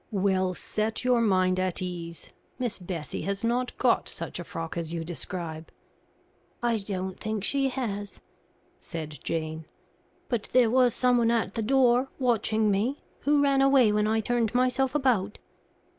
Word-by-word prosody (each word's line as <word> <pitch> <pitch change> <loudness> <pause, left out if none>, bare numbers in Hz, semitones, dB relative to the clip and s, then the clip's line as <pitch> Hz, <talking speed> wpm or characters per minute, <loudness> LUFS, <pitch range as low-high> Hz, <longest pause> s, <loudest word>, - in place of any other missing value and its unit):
"Well, 190 -3 +1
set 215 +6 -2
your 250 -2 +3
mind 185 -4 +2
at 185 -1 -1
ease; 170 -2 -6 0.3
Miss 245 -5 -3
Bessie 175 -4 -5
has 200 +2 -3
not 245 +2 0
got - - +2
such - - -5
a - - -4
frock 165 0 -6
as 165 -2 -4
you 165 -1 -3
describe." 165 -1 -6 0.9
"I 235 -1 +2
don't 190 -2 -4
think 215 -2 -3
she 275 +4 +2
has," 205 -7 -4 0.6
said 155 -2 -7
Jane; 160 -1 -3 0.6
"but 235 -4 -2
there 245 -3 +5
was 250 -2 +4
someone 245 -2 +3
at 230 -4 0
the 225 - -2
door, 255 +2 +3
watching 220 -4 +2
me, 225 +8 -1 0.2
who 290 +1 +3
ran 275 -1 +3
away 270 -5 +5
when 210 0 +2
I 220 +1 +2
turned 235 0 0
myself 255 +2 +2
about." 235 -8 +1
215 Hz, 155 wpm, -27 LUFS, 185-250 Hz, 0.9 s, there